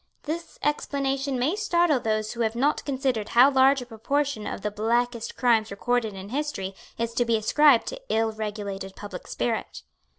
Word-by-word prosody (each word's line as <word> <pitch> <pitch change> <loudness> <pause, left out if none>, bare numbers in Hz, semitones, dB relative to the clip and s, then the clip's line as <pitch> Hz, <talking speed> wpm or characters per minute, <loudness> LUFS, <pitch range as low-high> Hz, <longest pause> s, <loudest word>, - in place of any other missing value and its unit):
This 330 +3 -5
explanation 275 -2 -1
may 275 +9 +1
startle 345 -8 +2
those 215 -1 -1
who 235 - -4
have 225 0 0
not 280 +5 +1
considered 260 -6 -1
how 260 +4 +8
large 265 0 +4
a - - -12
proportion 250 +1 -2
of - - -5
the 210 +1 -2
blackest 235 +2 -1
crimes 230 -4 +3
recorded 225 +1 -1
in 190 +1 -8
history 255 -8 -3 0.2
is 230 0 -2
to 240 - +2
be 230 -1 +2
ascribed 270 +4 +4
to - - -8
ill 225 0 +1
regulated 205 -3 -5
public 200 -3 -8
spirit. 230 -2 -3
240 Hz, 170 wpm, -26 LUFS, 215-275 Hz, 0.2 s, how